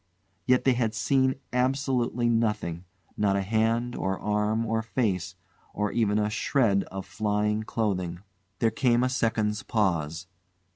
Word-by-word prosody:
Yet 125 -1 +4
they 130 - +4
had 115 -3 -1
seen 130 +4 +2 0.2
absolutely 125 -2 +1
nothing 105 -7 0 0.3
not 100 -2 +1
a 100 - 0
hand, 115 +4 0
or 95 0 -1
arm, 105 +2 0
or 110 0 0
face, 100 -6 -1 0.4
or 105 0 0
even 105 -3 +1
a 105 -1 +2
shred 105 -2 +1
of 95 0 -7
flying 105 0 0
clothing. 95 -6 -2 0.4
There 115 +2 +2
came 120 -1 +2
a 130 - +2
second's 110 -4 0
pause. 85 -7 -1
110 Hz, 140 wpm, -27 LUFS, 100-120 Hz, 0.4 s, Yet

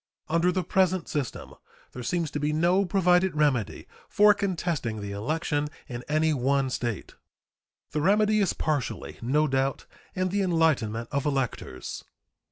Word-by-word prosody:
Under 170 +3 +3
the 185 0 -1
present 185 -1 +1
system 145 -5 -4 0.4
there 125 - -8
seems 165 +4 -1
to 150 - -3
be 150 +1 0
no 175 +5 +2
provided 180 -1 +3
remedy 140 -8 0 0.2
for 210 0 +6
contesting 170 - -2
the 100 -1 -5
election 145 +7 -1 0.2
in 120 -3 -6
any 155 +1 +2
one 135 0 +1
State. 120 -5 -3 0.8
The 150 - -1
remedy 210 +4 +3
is 195 -4 +2
partially, 150 -5 -3
no 150 +6 +2
doubt, 135 0 -1 0.3
in 185 0 0
the 200 +2 0
enlightenment 150 - +1
of 140 0 -1
electors. 135 -4 -3
155 Hz, 145 wpm, -27 LUFS, 135-180 Hz, 0.8 s, for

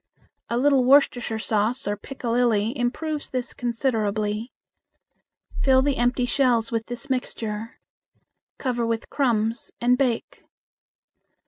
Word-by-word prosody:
A 235 - 0
little 270 0 +4
Worcestershire 245 -4 +3
sauce 220 +3 -1
or 205 - 0
piccalilli 235 -1 0
improves 295 +4 -2
this 255 -1 -3
considerably. 220 -2 -1 1.1
Fill 265 -1 +4
the 285 -1 +1
empty 245 +1 +1
shells 245 -2 +2
with 225 -1 -2
this 245 +3 -5
mixture. 225 -4 -4 0.8
Cover 245 -3 -1
with 230 -1 -2
crumbs 230 -4 0
and 250 +2 +3
bake. 250 -4 -1
240 Hz, 110 wpm, -24 LUFS, 225-260 Hz, 1.1 s, little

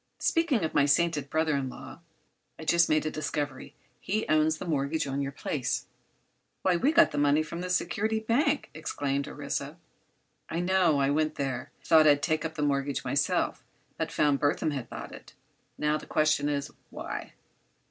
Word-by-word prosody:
Speaking 325 - +1
of 160 - -2
my 145 - +4
sainted 145 -1 +2
brother 160 0 +1
in 135 -2 -1
law, 130 - -10 0.6
I've 160 - -9
just 170 +1 +4
made 155 0 +2
a 155 - -1
discovery. 145 -3 -4 0.2
He 215 +3 -2
owns 155 0 +3
the - - -6
mortgage 150 -1 0
on 140 0 -2
your 140 0 -2
place." 135 -1 -2 0.8
"Why, 185 -1 +3
we 265 - +2
got 335 +1 +5
the - - -2
money 145 +2 +3
from 170 +3 -6
the 180 - -4
Security 205 +5 0
Bank!" 280 +7 +1
exclaimed 140 -3 -2
Orissa. - - -4 0.7
"I 165 - -2
know. 175 -4 +3
I 135 0 +2
went 155 +1 +1
there. 135 -3 -3
Thought 160 -2 +6
I'd 145 -1 +4
take 155 +2 +1
up 160 -1 -4
the 150 - -2
mortgage 140 -1 0
myself, - - 0 0.3
but - - -3
found 145 -2 +2
Burthon 150 +1 +1
had 130 -5 -5
bought - - -7
it. - - -13 0.4
Now, 150 0 +1
the - - -12
question 155 -2 +2
is, 140 -1 -2 0.2
why?" - - -6
155 Hz, 180 wpm, -28 LUFS, 140-170 Hz, 0.8 s, Thought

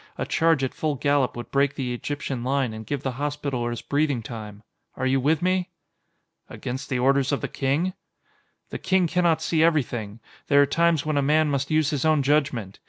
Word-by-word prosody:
A - - -2
charge 160 -4 +2
at 130 - -1
full 155 -2 -1
gallop 140 -2 +1
would 120 - -7
break 140 0 +2
the 125 -3 -3
Egyptian 135 -1 -4
line 130 -2 0
and 110 -1 -8
give 140 +1 -3
the 130 -1 -3
Hospitallers 140 -5 -2
breathing 145 -5 0
time. 105 -1 -8 0.3
Are 130 - -3
you 135 +1 +2
with 155 +5 +1
me?" 185 0 +1 0.8
"Against 130 +2 -6
the 130 - 0
orders 135 +2 +2
of 140 - -1
the - - -2
King?" 145 +7 -1 0.8
"The - - -4
King 185 -1 +2
cannot 165 -1 +1
see 160 -2 +1
everything! 120 -10 0 0.3
There 145 - +5
are 145 - +7
times 165 +1 +2
when 155 -1 0
a - - +3
man 150 +2 +2
must 140 0 -1
use 155 -1 +2
his 145 -3 -1
own 155 -3 +3
judgment! 135 -9 0
140 Hz, 195 wpm, -24 LUFS, 125-155 Hz, 0.8 s, are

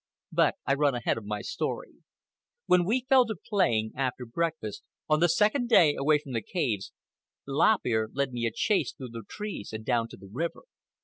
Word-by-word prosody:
But - - +3
I 135 - +2
run 140 -1 +2
ahead 120 -1 0
of 105 - -13
my 105 0 -3
story. - - -4 0.7
When 180 -1 +4
we 245 +6 0
fell 260 -2 +5
to 220 - -3
playing, 115 - 0
after 130 -2 -2
breakfast, 155 -4 -3 0.3
on 155 0 +3
the 175 +1 +4
second 215 - +2
day 170 -10 +6
away 150 +2 +3
from 145 -2 -10
the 115 -2 -1
caves, 115 - -2 0.6
Lop 160 +10 +3
Ear 110 -2 +1
led 140 -1 -1
me 120 -1 -1
a - - -2
chase 200 - +1
through 130 -4 -8
the 115 0 -7
trees 210 - -6
and 110 0 -6
down 115 -2 +1
to - - -12
the 100 - -13
river. 165 +7 -3
140 Hz, 195 wpm, -28 LUFS, 115-180 Hz, 0.7 s, day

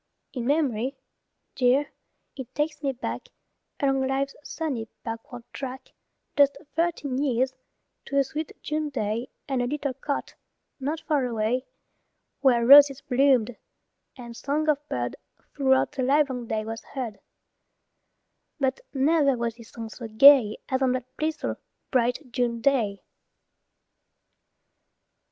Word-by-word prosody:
In 245 -3 -3
mem'ry, 270 -4 +1 0.6
dear, 260 +3 +2 0.4
it 265 -4 -9
takes 300 +1 -1
me 280 -2 0
back 265 - -5 0.5
Along 270 -2 +1
life's 275 +1 -1
sunny 280 -8 -3 0.2
backward 230 +1 -7
track 265 -1 -7 0.4
Just 285 -1 +4 0.2
thirteen 315 -6 0
years, 260 -2 +1 0.5
to 280 - -2
a 275 - +5
sweet 305 +3 -6
June 305 0 -2
day 230 -2 -2 0.2
And 265 -3 0
a 245 - 0
little 280 0 -2
cot, 280 +2 -4 0.5
not 295 +4 -3
far 290 -5 +1
away, 235 +2 -1 0.7
Where 245 -4 +4
roses 280 +1 +8
bloomed, 250 -3 +2 0.6
and 235 -2 -9
song 290 +5 -1
of 295 -2 +3
bird 120 0 -2 0.4
Throughout 265 -2 +2
the 285 -2 -4
livelong 260 -2 +1
day 215 -1 -2
was 225 +1 -5
heard; 240 -6 -6 1.4
But 265 -1 0 0.2
never 280 -1 +3
was 235 -1 -1
this 230 -2 -13
song 225 -1 -7
so 230 +1 -8
gay 225 -1 +7
As 260 -1 -1
on 260 -1 +3
that 255 0 -5
blissful, 310 0 -2 0.3
bright 250 +1 0
June 240 -2 0
day. 230 -6 +1
265 Hz, 130 wpm, -26 LUFS, 240-285 Hz, 1.4 s, roses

